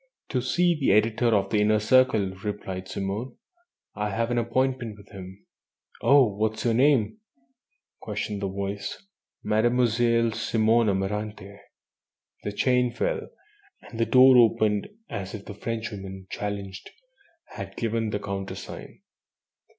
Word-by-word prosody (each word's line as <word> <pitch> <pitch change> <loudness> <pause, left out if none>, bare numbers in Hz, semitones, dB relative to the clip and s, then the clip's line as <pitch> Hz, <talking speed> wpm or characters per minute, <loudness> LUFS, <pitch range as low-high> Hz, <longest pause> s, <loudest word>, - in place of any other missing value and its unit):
"To 130 - 0
see 175 +8 +2
the 145 -10 +2
editor 110 +3 +2
of 100 -4 +2
the 105 - +2
Inner 110 +1 +3
Circle," 110 -3 +3
replied 95 -3 -5
Simone. 100 +7 -4 0.6
"I 105 0 -2
have 115 +4 -1
an 120 - +2
appointment 120 -1 -1
with 100 -1 -17
him." 95 0 -11 0.6
"Oh! 140 -1 +6
What 110 +1 -1
is 110 - -6
your 115 - +3
name?" 135 - +3 0.8
questioned 105 -1 -4
the 100 - -1
voice. 100 - -5 0.4
"Mademoiselle 115 +1 +2
Simone 110 0 +2
Amaranthe." 100 +1 -3 0.8
The 105 - -4
chain 125 +3 +2
fell, 470 - -2 0.6
and 115 - -10
the 115 - +2
door 130 0 +7
opened 110 -3 +3 0.2
as 95 +1 -5
if 100 - -9
the - - -7
Frenchwoman, 100 -3 -6
challenged, 100 -2 -5 0.6
had - - -8
given 115 -1 -1
the 105 - -1
countersign. 100 -1 -7
110 Hz, 130 wpm, -26 LUFS, 100-120 Hz, 0.8 s, door